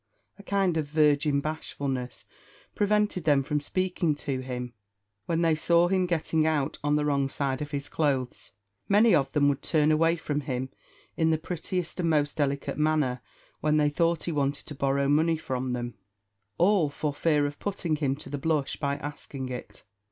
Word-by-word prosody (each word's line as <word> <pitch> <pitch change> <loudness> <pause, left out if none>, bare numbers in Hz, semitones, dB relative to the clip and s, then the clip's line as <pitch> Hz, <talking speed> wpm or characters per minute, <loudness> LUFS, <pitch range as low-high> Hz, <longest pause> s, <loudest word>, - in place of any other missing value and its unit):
A - - -8
kind 195 -4 +1
of 155 -2 -1
virgin 150 -1 +3
bashfulness 140 -4 -4 0.5
prevented 210 -3 +1
them 145 -3 +4
from 150 +2 -1
speaking 175 0 -1
to 140 -2 -3
him 125 -1 -5 0.5
when 170 0 +1
they 165 -1 +4
saw 170 +3 +3
him 185 -1 +2
getting 160 -2 +1
out 150 -4 0
on 145 0 +2
the 150 0 +1
wrong 140 -2 +1
side 135 -1 -2
of 150 - -4
his 140 -1 -4
clothes. 135 -5 -1 0.4
Many 210 +3 +5
of 135 -1 +2
them 145 -1 +3
would 140 -1 +1
turn 155 -1 +2
away 165 +2 +3
from 150 -3 -2
him 130 -2 -3 0.5
in 160 -1 +2
the 160 - +3
prettiest 175 +2 -4
and 170 -2 +1
most 145 -2 +1
delicate 140 -1 -1
manner 150 -5 +1 0.4
when 150 0 +2
they 150 -1 +3
thought 165 +1 +1
he 170 - -2
wanted 140 -2 -1
to - - -6
borrow 140 0 +1
money 160 +3 +3
from 130 -4 -3
them 120 -1 -3 0.6
all 180 -4 +3
for 145 +1 -3
fear 150 -1 +2
of 145 0 -5
putting 185 -6 -2
him 140 -3 0
to 140 - -10
the 145 - -3
blush 150 -2 0
by 140 -2 -1
asking 145 -2 -6
it. 125 -1 -8
150 Hz, 180 wpm, -27 LUFS, 140-165 Hz, 0.6 s, Many